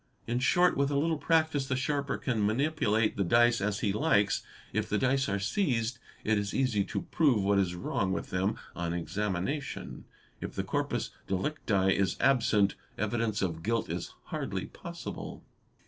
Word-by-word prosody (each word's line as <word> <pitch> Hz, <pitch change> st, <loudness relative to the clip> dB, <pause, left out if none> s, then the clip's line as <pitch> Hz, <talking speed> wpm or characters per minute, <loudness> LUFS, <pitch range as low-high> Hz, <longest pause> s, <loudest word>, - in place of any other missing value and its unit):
In 120 Hz, +1 st, 0 dB
short, 175 Hz, +7 st, +4 dB
with 140 Hz, 0 st, +2 dB
a 140 Hz, -, +1 dB
little 160 Hz, +1 st, +1 dB
practice 155 Hz, -3 st, +2 dB
the 130 Hz, -, 0 dB
sharper 140 Hz, +1 st, -1 dB
can 115 Hz, -6 st, -1 dB
manipulate 110 Hz, -2 st, +1 dB
the 100 Hz, -, +2 dB
dice 120 Hz, +4 st, +4 dB
as 100 Hz, 0 st, -1 dB
he 100 Hz, -, +1 dB
likes. 105 Hz, -6 st, +2 dB, 0.3 s
If -, -, -1 dB
the -, -, +1 dB
dice 130 Hz, -2 st, +2 dB
are 100 Hz, -, +1 dB
seized, 120 Hz, -, 0 dB, 0.2 s
it 110 Hz, -1 st, +2 dB
is 100 Hz, -1 st, -3 dB
easy 125 Hz, -7 st, +2 dB
to -, -, -3 dB
prove 135 Hz, -11 st, +2 dB
what 100 Hz, 0 st, +3 dB
is 90 Hz, -2 st, 0 dB
wrong 95 Hz, +2 st, -1 dB
with 95 Hz, -, -3 dB
them 95 Hz, +2 st, 0 dB, 0.2 s
on 85 Hz, -1 st, -2 dB
examination. 100 Hz, -, -3 dB, 0.3 s
If -, -, -6 dB
the -, -, -1 dB
corpus -, -, -1 dB, 0.2 s
delicti 95 Hz, -2 st, +1 dB
is 100 Hz, -1 st, +1 dB
absent, 110 Hz, -7 st, +3 dB, 0.2 s
evidence 110 Hz, 0 st, 0 dB
of 80 Hz, -3 st, -2 dB
guilt 115 Hz, +5 st, -1 dB
is -, -, -5 dB
hardly -, -, -3 dB
possible. -, -, -7 dB
110 Hz, 165 wpm, -30 LUFS, 100-135 Hz, 0.3 s, short